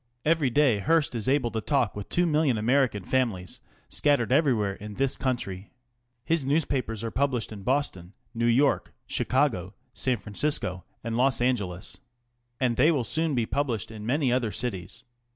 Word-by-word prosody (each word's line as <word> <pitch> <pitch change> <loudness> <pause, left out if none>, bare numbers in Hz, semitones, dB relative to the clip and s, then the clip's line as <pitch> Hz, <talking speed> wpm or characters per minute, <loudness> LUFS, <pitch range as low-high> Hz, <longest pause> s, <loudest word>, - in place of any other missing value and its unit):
Every 155 -4 +3
day 125 -4 +3
Hearst 160 +4 +2
is 115 -4 -4
able 135 -4 +2
to 110 - -2
talk 130 -5 +1
with 105 -1 -7
two 175 - +2
million 150 -6 +2
American 120 -2 +2
families 110 -7 -1 0.3
scattered 140 -6 +1
everywhere 125 -9 +3
in 105 +1 -9
this 135 0 +1
country. 105 -7 -3 0.6
His 165 -3 +1
newspapers 130 -6 0
arc 115 - -4
published 130 -5 0
in 105 -2 -8
Boston, 100 -7 -1 0.2
New 115 0 0
York, 135 +4 +2
Chicago, 115 - 0 0.2
San 130 -2 0
Francisco 100 -3 -2 0.2
and 115 0 -3
Los 130 +1 +2
Angeles. 105 -7 -2 0.6
And 125 -3 +1
they 150 +6 +5
will 140 -6 +1
soon 160 +3 0
be 120 -2 +1
published 120 -6 -2
in 110 -1 -8
many 130 +2 +1
other 125 -4 0
cities. 110 0 -4
125 Hz, 160 wpm, -27 LUFS, 105-140 Hz, 0.6 s, they